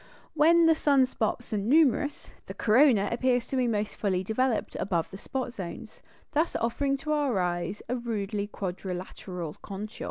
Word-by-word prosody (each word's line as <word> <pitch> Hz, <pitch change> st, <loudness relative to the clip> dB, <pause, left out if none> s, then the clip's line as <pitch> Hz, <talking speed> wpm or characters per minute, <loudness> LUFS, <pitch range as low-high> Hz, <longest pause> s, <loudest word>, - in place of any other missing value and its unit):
When 325 Hz, +2 st, +5 dB
sun 280 Hz, -4 st, +3 dB
spots 225 Hz, -3 st, -3 dB
are 210 Hz, -, +1 dB
numerous, 290 Hz, +5 st, +2 dB, 0.2 s
the -, -, -7 dB
corona 225 Hz, -3 st, +4 dB
appears 245 Hz, 0 st, +1 dB
to -, -, -2 dB
be 255 Hz, -2 st, +2 dB
most 210 Hz, -2 st, -1 dB
fully 190 Hz, -3 st, 0 dB
developed 230 Hz, +4 st, 0 dB
above 170 Hz, -4 st, -1 dB
the 195 Hz, -, -7 dB
spot 255 Hz, +1 st, -4 dB
zones, 200 Hz, +3 st, -8 dB, 0.3 s
thus 315 Hz, +3 st, 0 dB
offering 275 Hz, +4 st, 0 dB
to 305 Hz, +2 st, -4 dB
our 285 Hz, -7 st, +1 dB
eyes 180 Hz, +2 st, -2 dB
a 250 Hz, -, -1 dB
rudely 210 Hz, -4 st, -3 dB
quadrilateral 180 Hz, -3 st, -5 dB
contour. 205 Hz, +2 st, -7 dB
230 Hz, 155 wpm, -28 LUFS, 195-270 Hz, 0.3 s, When